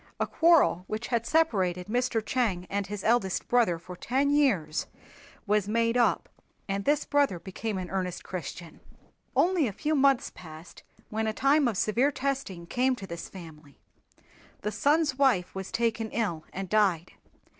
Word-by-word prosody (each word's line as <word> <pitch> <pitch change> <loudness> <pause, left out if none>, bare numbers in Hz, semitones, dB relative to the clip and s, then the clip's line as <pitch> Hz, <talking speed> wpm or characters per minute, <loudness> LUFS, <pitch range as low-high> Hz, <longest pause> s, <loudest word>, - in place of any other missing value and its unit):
A - - +1
quarrel 325 - +4
which 220 +2 -4
had 235 -2 0
separated 190 - +1
Mr. 235 0 -1
Chang 215 -9 0
and 200 0 -1
his 205 0 -6
eldest 220 -5 +1
brother 230 -9 +3
for 175 +2 -10
ten 270 +9 0
years 205 - +1 0.6
was 210 -1 +1
made 230 +2 +1
up 245 -1 +2 0.4
and 195 0 -2
this 295 0 +2
brother 285 -10 +2
became 195 +4 -5
an 180 -1 -5
earnest 185 -2 -3
Christian. 175 -2 -7 0.6
Only 350 -6 +3
a - - -3
few 305 +9 -1
months 275 -3 +3
passed 160 0 -12 0.3
when 220 0 -1
a 220 - -1
time 275 +3 +3
of 220 -5 -1
severe 240 +9 +2
testing 265 -11 -3
came 255 +7 +1
to 200 - -8
this 170 -2 -7
family. 160 -6 -12 0.8
The 210 - -2
son's 295 +1 +1
wife 240 -11 +2
was 190 0 -6
taken 225 -1 -1
ill 200 -10 -2
and 195 0 -5
died. 190 -5 +1
215 Hz, 160 wpm, -28 LUFS, 185-260 Hz, 0.8 s, quarrel